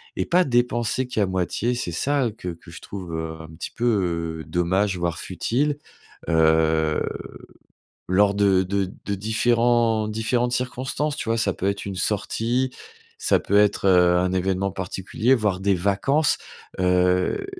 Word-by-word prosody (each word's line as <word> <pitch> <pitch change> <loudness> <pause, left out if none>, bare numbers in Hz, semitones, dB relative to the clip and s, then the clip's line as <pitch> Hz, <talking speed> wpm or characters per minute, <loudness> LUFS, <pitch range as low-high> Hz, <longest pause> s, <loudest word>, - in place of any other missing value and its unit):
et 95 - -1
pas 180 +1 +4
dépenser 120 -1 0
qu'à 110 -5 0
moitié, 95 +6 -1
c'est 105 -7 -3
ça, 140 - +1
heu, - - -3
que 95 -4 -7
que 85 -1 -10
je - - -9
trouve, 90 -4 -8
heu, 80 0 -4
un 80 - -10
petit 85 - -6
peu 85 -9 -1
dommage 90 +4 0
voire 85 -1 -1
futile, 135 - -1 0.5
heu, 80 -1 +3 1.1
lors 100 +2 +3
de 100 -2 +3
de 95 0 -2
de 100 - -1
différents 115 +1 +2
différentes 120 +3 0
circonstances, 130 +4 -2
tu 115 - -5
vois? 115 - +1
Ça 100 -4 +1
peut 95 - -3
être 100 0 -3
une 100 - -4
sortie, 115 +6 0 0.5
ça - - +2
peut 100 - 0
être, 105 -1 +2
heu, 90 -2 +5
un 90 +1 0
évènement 95 +1 0
particulier, 95 +6 0
voire 105 -6 0
des 100 0 +2
vacances. 100 - +2 0.4
Heu, 90 - +2
100 Hz, 155 wpm, -23 LUFS, 90-120 Hz, 1.1 s, heu